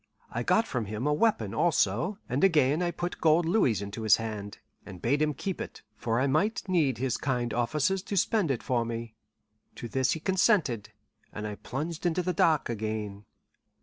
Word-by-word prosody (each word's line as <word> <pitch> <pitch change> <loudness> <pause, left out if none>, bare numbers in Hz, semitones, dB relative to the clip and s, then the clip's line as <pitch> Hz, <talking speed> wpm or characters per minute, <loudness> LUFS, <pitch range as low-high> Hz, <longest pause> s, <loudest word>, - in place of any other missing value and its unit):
I - - -2
got 225 - +3
from 125 - -2
him 105 +5 -4
a 150 - +2
weapon, 150 - +1
also, 170 - +1
and 130 +7 -1
again 155 -4 +4
I 175 - +1
put 175 +1 -4
gold 160 +1 +4
louis 135 - +2
into 100 +3 -6
his 110 -1 +6
hand, 105 -3 -5 0.3
and 95 -2 -10
bade 140 +8 +1
him 150 -1 +1
keep 190 +6 -4
it, - - -8
for 115 +1 -1
I 130 - +2
might 175 +12 0
need 155 - +2
his 130 0 -1
kind 125 -4 -1
offices 150 +10 +1
to 200 +1 -4
spend 200 -1 +2
it 130 -4 -1
for 120 -2 +1
me. 115 -1 -5 0.6
To 120 - -6
this 130 +2 +1
he 160 - -4
consented, 155 - +1 0.4
and 105 - -6
I 105 - -3
plunged 155 - -4
into 175 +1 0
the 180 +1 -1
dark 160 -2 +3
again. 110 -2 -4
135 Hz, 190 wpm, -28 LUFS, 115-170 Hz, 0.6 s, his